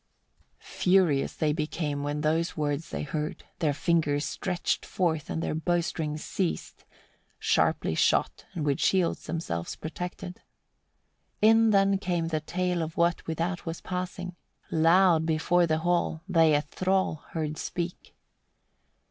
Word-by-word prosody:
42. - - -14
Furious 180 -7 +3
they 150 -2 +1
became, 150 -2 -2
when 145 +1 -2
those 165 +3 0
words 150 +1 -1
they - - -4
heard; 150 +1 -4 0.2
their 155 -3 +2
fingers 145 -1 +1
they - - -3
stretched 180 -3 -1
forth, 160 -5 -1
and 165 - -2
their - - -1
bowstrings 160 -2 -1
seized; 185 -4 -3 0.5
sharply - - +1
shot, - - +1
and 155 -3 -2
with 140 -2 +1
shields 185 -3 +1
themselves 90 - -3
protected. 180 +3 -6 1.0
43. 215 - +7
In 225 0 +5
then 195 -1 +4
came 175 -4 -1
the 155 -2 -1
tale 180 +2 -1
of 160 0 -5
what 170 0 +1
without 170 +2 -2
was 165 0 -3
passing; 180 0 -5 0.4
loud 165 +1 +5
before 170 +2 +2
the 155 0 +2
hall 175 -2 +1
they 165 -5 +4
a 145 - +1
thrall 185 +2 0 0.2
heard 155 -2 -3
speak. 175 0 -5
165 Hz, 140 wpm, -28 LUFS, 155-180 Hz, 1.0 s, 43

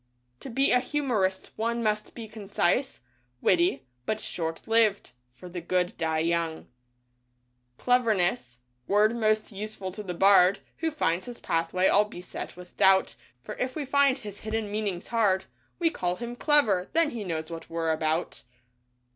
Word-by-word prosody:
To - - -8
be 270 +3 +2
a 250 - +5
humorist 245 -9 -1
one 235 +1 -1
must 210 -1 -1
be 230 -2 -7
concise, 210 - -1 0.4
witty, 170 -6 +2 0.2
but 215 - 0
short 165 -4 -4
lived, 225 - +2 0.2
for 130 +9 -13
the 175 0 -6
good 180 +1 0
die 160 -1 -1
young. 170 -1 -1 1.1
Cleverness 220 - +1
— 125 0 -45
word 210 +3 +3
most 215 -1 +1
useful 200 -2 -5
to 210 - -7
the 180 -4 -5
Bard 195 0 +6 0.2
Who 325 - 0
finds 190 - -1
his 240 -1 -8
pathway 165 +3 0
all 205 +1 +5
beset 180 -3 -8
with 180 0 -13
doubt, 190 0 +4 0.3
For - - -6
if 255 0 -2
we 300 -3 -3
find 280 0 +3
his 205 -5 -9
hidden 215 -1 -3
meanings 205 -4 -3
hard, 205 -5 +2 0.3
We 330 -2 +2
call 180 - -2
him 240 +3 -6
"clever" 235 - +3
— - - -37
then 330 -2 +3
he 230 -3 -5
knows 160 -3 -4
what 165 0 -8
we're 165 -1 -1
about. 160 +1 -1
205 Hz, 165 wpm, -27 LUFS, 175-230 Hz, 1.1 s, Bard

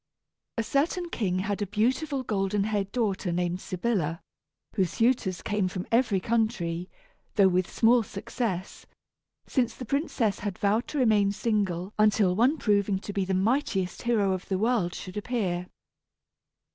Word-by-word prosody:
A 230 - +1
certain 330 +9 0
king 185 -5 0
had 205 +2 -2
a 205 - -1
beautiful 260 - 0
golden 200 -2 0
haired 205 -2 -1
daughter 205 -6 -1
named 175 +1 -1
Sybilla, 180 -5 -1 0.5
whose 190 -4 +1
suitors 225 -6 +1
came 205 -3 0
from 185 0 -4
every 230 -4 +3
country, 185 -6 -1 0.5
though 200 -2 +6
with 185 0 +1
small 235 +1 +4
success, 195 -2 -4 0.6
since 240 -4 0
the 250 - -7
princess 250 -5 0
had 205 -3 -4
vowed 210 +4 +1
to 300 - -4
remain 215 -6 +4
single 200 -3 -1
until 210 -3 +4
one 250 +9 +3
proving 200 -5 +2
to 205 +1 -7
be 195 -2 0
the 190 0 0
mightiest 195 -3 0
hero 215 -5 +2
of 185 0 -5
the 190 - +1
world 215 -4 +1
should 185 +1 -7
appear. 195 -6 -2
205 Hz, 150 wpm, -27 LUFS, 185-235 Hz, 0.6 s, though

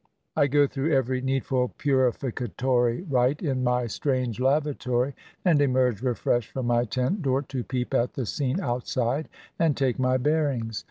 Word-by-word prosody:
I 145 - +4
go 145 +1 +4
through 140 +3 -2
every 130 -1 +1
needful 130 -1 -1
purificatory 125 - 0
rite 130 +2 +1
in 130 -5 0
my 125 0 +1
strange 125 -1 -1
lavatory, 135 -2 +1 0.3
and 165 -5 +4
emerge 125 -5 +2
refreshed 120 -2 0
from 130 -2 -3
my 120 0 +2
tent 130 - -1
door 135 -1 +1
to 130 -2 -4
peep 125 0 -3
at 120 +1 +1
the 130 - -3
scene 135 - -1
outside 125 0 -1 0.3
and 160 -4 +2
take 130 -3 0
my 130 0 +2
bearings. 130 -6 0
130 Hz, 155 wpm, -26 LUFS, 125-140 Hz, 0.3 s, I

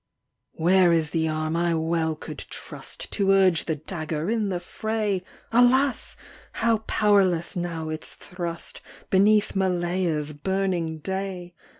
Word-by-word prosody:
Where 180 +1 +4
is 160 -3 +1
the 160 -1 +1
arm 155 0 -1
I 170 0 +1
well 160 0 0
could - - -8
trust - - -8
To 200 -2 +1
urge 190 -4 +4
the 160 - -1
dagger 155 +2 -4
in 220 -3 0
the 180 -2 -1
fray? 210 +1 -2 0.3
Alas! 250 +3 +3 0.4
how 225 -1 +2
powerless 190 -5 +2
now 170 -3 -3
its 155 0 -5
thrust, 170 -2 -6 0.3
Beneath 205 +2 +4
Malaya's 175 -5 0
burning 175 0 -1
day 190 +1 -4
180 Hz, 125 wpm, -25 LUFS, 160-195 Hz, 0.4 s, Where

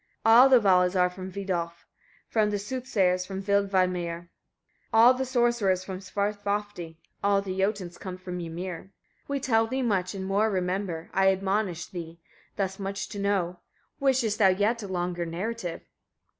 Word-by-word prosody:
33. 225 - +5
All 250 +4 +8
the 255 -2 +7
Valas 180 -3 +3
are 180 -1 +3
from 185 +1 -7
Vidolf; 175 -3 -4 0.5
all 215 -1 +4
the 210 0 -1
soothsayers 205 -5 0
from 190 +1 -6
Vilmeidr, 185 -4 0 0.6
all 230 +3 +7
the 260 +1 -3
sorcerers 235 -7 +1
from 185 -1 -6
Svarthofdi; 205 -3 -3 0.3
all 200 0 +3
the 190 -2 -4
Jotuns 190 -3 -1
come 185 -1 -6
from 180 -1 -6
Ymir. 170 +1 -5
34. 190 - -25 0.4
We 280 0 -1
tell 225 -5 +2
thee 260 +2 -2
much, 195 -4 0
and 190 -1 -4
more 200 +3 +2
remember, 180 -3 -2
I 195 0 +4
admonish 190 -2 -1
thee 170 -2 -8 0.4
thus 190 -1 -2
much 195 0 -4
to 205 - -6
know. 190 -3 0 0.4
Wishest 255 -6 +1
thou 200 - +6
yet 205 +5 +1
a 200 - -6
longer 175 -1 -2
narrative? 175 +2 -4
195 Hz, 160 wpm, -27 LUFS, 180-210 Hz, 0.6 s, All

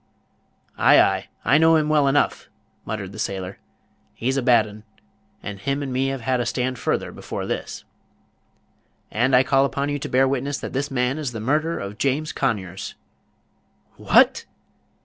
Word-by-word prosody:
"Ay, - - +6
ay, - - +2 0.2
I 140 +6 +5
know 160 0 +5
him 155 -1 +2
well 150 -2 +3
enough," 140 +1 +1 0.4
muttered - - -5
the - - -10
sailor; 95 -1 -4 0.6
"he's 130 +3 -1
a 135 - +1
bad 120 -3 +4
'un; 105 0 -11 0.6
and 100 -1 -6
him 140 +5 -2
and 135 -2 -4
me 130 +1 +1
have 135 -1 -3
had 130 +2 0
a 120 - -1
stand 125 +1 -2
further, - - -1
before - - -6
this." - - -5 1.3
"And 125 +4 +2
I 125 - +6
call 135 0 +3
upon 140 +1 -1
you 145 0 -2
to - - -5
bear 130 +1 +3
witness 140 +1 -1
that - - -7
this 140 +2 -1
man 130 +1 -1
is 140 -5 -3
the 110 - -5
murderer 155 +8 0
of 100 +2 -7
James 140 +3 0
Conyers!" 95 -8 -3 1.0
"WHAT?" - - +4
130 Hz, 170 wpm, -23 LUFS, 120-140 Hz, 1.3 s, Ay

